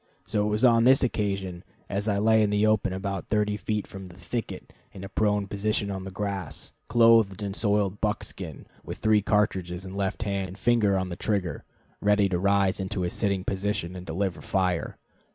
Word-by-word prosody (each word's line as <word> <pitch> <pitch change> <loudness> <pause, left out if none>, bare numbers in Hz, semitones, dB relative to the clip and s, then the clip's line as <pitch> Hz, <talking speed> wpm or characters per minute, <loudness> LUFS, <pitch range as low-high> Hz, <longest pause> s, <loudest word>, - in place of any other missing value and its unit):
So 105 -1 0
it - - 0
was 105 +4 +2
on 115 -2 +5
this 130 +2 +6
occasion, 100 -6 -2 0.2
as 100 +2 -3
I 100 -2 +1
lay 110 +2 +4
in 105 - +3
the 105 +1 +2
open 110 -3 +2
about 95 0 -4
thirty 105 -1 +1
feet 105 +1 -2
from 95 -1 -9
the 90 0 -14
thicket, 115 +4 -5 0.2
in 95 - -9
a 100 - -7
prone 105 0 +1
position 100 +1 -1
in 95 -1 -5
the - - -5
grass, 95 -5 -4 0.2
clothed 115 -4 +4
in 100 -1 -3
soiled 100 -2 0
buckskin, 105 -1 -3 0.2
with - - -7
three 110 -1 +3
cartridges 95 -4 0
in 95 - -8
left 100 +2 -2
hand 100 -2 -2
and 95 +2 -10
finger 105 -2 +3
on 95 -1 -2
trigger, 100 -5 -2 0.4
ready 105 -1 +3
to 90 -2 0
rise 100 0 +2
into 95 -1 -2
a 90 - -1
sitting 100 -3 0
position 95 -2 -2
and 90 -1 -8
deliver 90 +3 -2
fire. 90 -3 -1
100 Hz, 190 wpm, -26 LUFS, 95-105 Hz, 0.4 s, this